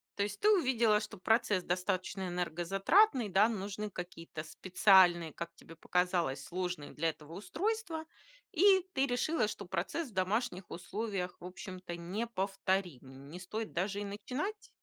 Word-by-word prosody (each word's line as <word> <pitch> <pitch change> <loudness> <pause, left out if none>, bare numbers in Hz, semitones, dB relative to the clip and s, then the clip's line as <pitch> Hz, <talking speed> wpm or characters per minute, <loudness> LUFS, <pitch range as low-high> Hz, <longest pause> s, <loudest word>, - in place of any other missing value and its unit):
То 200 - +1
есть 205 0 -4
ты 420 - +4
увидела, 240 - +4
что 210 -1 -7
процесс 205 -1 +2
достаточно 185 +1 -1
энергозатратный, 195 - +2
да? 205 +5 +5
Нужны 210 0 -4
какие-то 165 -4 -7
специальные, 175 0 +4
как 170 0 -6
тебе 165 - -14
показалось, 175 -5 0
сложные 180 -4 -4
для 165 +2 +1
этого 155 0 -9
устройства, 330 - -2 0.5
и 380 +1 +5
ты 270 +1 +2
решила, 245 0 +1
что 205 - -6
процесс 200 - -2
в - - -18
домашних 190 +1 -1
условиях, 195 0 -4
в - - -10
общем-то, 180 -1 -7
неповторим. 185 - -3
Не 180 - -7
стоит 215 +5 -5
даже 195 +3 -1
и 205 - -3
начинать? 255 - -4
195 Hz, 140 wpm, -33 LUFS, 175-225 Hz, 0.5 s, да